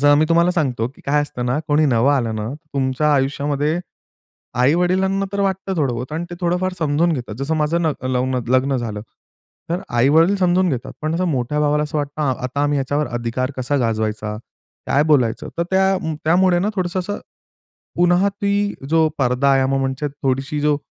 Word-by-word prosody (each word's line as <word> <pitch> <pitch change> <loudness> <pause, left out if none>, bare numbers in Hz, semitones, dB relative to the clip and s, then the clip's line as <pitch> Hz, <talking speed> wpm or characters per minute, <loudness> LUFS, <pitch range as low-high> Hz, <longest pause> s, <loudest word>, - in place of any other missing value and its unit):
जर 145 0 +6
मी 155 - +4
तुम्हाला 170 +1 +4
सांगतो, 130 -10 0
की 130 - -19
काय 145 +1 +3
असतं 125 -4 -5
ना, 125 +4 0
कोणी 150 +1 +3
नवं 130 +2 +3
आलं 120 -5 0
ना, 105 +1 -3 0.3
तुमच्या 135 +3 +1
आयुष्यामध्ये, 145 +4 0 0.8
आई-वडिलांना 185 +8 +2
तर 200 - -1
वाटतं 190 0 -1
थोडं 135 -6 +1
बोहोत 125 +5 -5
आणि 165 +2 -3
ते 175 - -6
थोडंफार 180 +1 0
समजून 160 +2 +2
घेतात, 120 -7 -5
जसं 150 +4 -1
माझं 155 +3 +1
नग 150 -5 -2
लवं 130 0 0
नग 125 -2 -3
लग्न 135 +1 +1
झालं. 110 -4 -4 0.7
तर 175 +2 0
आई-वडील 155 +11 +4
समजून 180 0 +2
घेतात, 125 -5 -4
पण 155 +1 -1
असं 185 +2 0
मोठ्या 140 -1 -1
भावाला 150 0 +2
असं 150 +1 -3
वाटतं, 145 +1 -3 0.2
आता 135 +3 -1
आम्ही 145 0 +1
याच्यावर 145 +2 -1
अधिकार 120 +2 -2
कसा 130 +3 0
गाजवायचा? 110 -3 -1 0.5
काय 145 - +3
बोलायचं? 135 -7 +1
तर 170 - +1
त्या 190 0 +3 0.3
त्यामुळे 175 +2 +4
ना, 200 +4 0
थोडंसं 185 -1 -1
असं 205 +3 -4 0.8
पुन्हा 175 +3 +3
ती 200 +1 -1 0.2
जो 160 0 +4
पडदा 130 +1 +2
आहे, 135 -1 +3
म्हणजे 135 +2 -1
थोडीशी 135 0 -2
जो 150 -1 +2
145 Hz, 180 wpm, -20 LUFS, 130-175 Hz, 0.8 s, जर